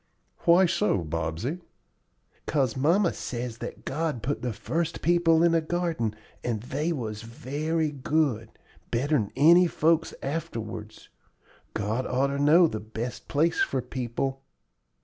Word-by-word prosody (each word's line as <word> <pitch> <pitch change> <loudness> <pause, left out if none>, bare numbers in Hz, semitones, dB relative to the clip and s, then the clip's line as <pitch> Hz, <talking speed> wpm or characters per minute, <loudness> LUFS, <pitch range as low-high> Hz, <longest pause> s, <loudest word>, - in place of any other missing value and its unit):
"Why 175 +2 +6
so, 105 - +1
Bobsey?" 80 - -3 0.9
"'Cause 135 -6 +1
mamma 170 +8 +3
says 120 -1 -5
that - - -7
God 150 -5 -2
put 145 +3 -2
the 125 - -1
first 165 - -3
people 170 -1 +4
in 170 -1 +4
a 165 - +3
garden 160 -10 -1 0.3
and 115 -3 -1
they 140 +8 -2
was 110 -8 -4
very 150 +7 -2
good, 135 -5 0 0.4
better'n 125 -3 +1
any 170 +6 +6
folks 165 0 +1
afterwards. 115 -8 -5 0.7
God 110 +4 -1
oughter 140 +2 0
know 155 +5 +6
the 110 -9 -2
best 110 +3 -6
place 160 +3 +1
for 135 - +1
people." 130 +2 -3
135 Hz, 130 wpm, -27 LUFS, 115-165 Hz, 0.9 s, Why